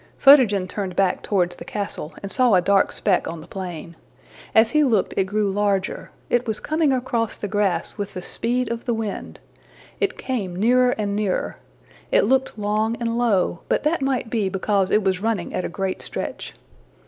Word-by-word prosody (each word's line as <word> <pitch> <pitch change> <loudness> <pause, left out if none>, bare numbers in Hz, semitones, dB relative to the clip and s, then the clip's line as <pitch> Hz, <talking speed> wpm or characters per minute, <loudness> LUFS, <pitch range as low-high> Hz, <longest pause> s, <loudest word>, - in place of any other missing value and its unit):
'' - - -33
Photogen 235 -10 +6
turned 190 -2 -4
back 190 -1 +1
towards 180 -3 0
the - - -8
castle, 200 -6 -5
and 200 - -2
saw 250 -5 +4
a - - +6
dark 195 +2 +3
speck 190 -3 +1
on 165 - -5
the 155 - -11
plain. 175 -3 -7 0.6
As 220 +1 +5
he 305 0 +4
looked, 225 -8 +1
it 195 - +2
grew 205 +1 0
larger: 200 -1 -1 0.2
it 245 0 0
was 220 -1 -1
coming 310 -1 +1
across 240 -3 -1
the 205 - -4
grass 205 0 -1
with 200 -1 -4
the 185 - -4
speed 245 +4 -1
of 235 0 -4
the 240 - 0
wind. 220 -3 -5 0.6
It 410 -3 0
came 205 -9 -3
nearer 250 +6 +4
and 205 -2 -1
nearer. 205 -3 -1 0.5
It - - +4
looked 265 -3 +1
long 215 +2 0
and 230 -1 -1
low, 205 -8 +1
but - - +1
that 305 +2 +1
might 265 -4 -1
be 215 -5 0
because 195 0 0
it 215 - +3
was 190 -1 0
running 215 -5 -1
at 180 - -2
a - - -3
great 190 +1 -3
stretch. - - -5
210 Hz, 195 wpm, -22 LUFS, 190-240 Hz, 0.6 s, Photogen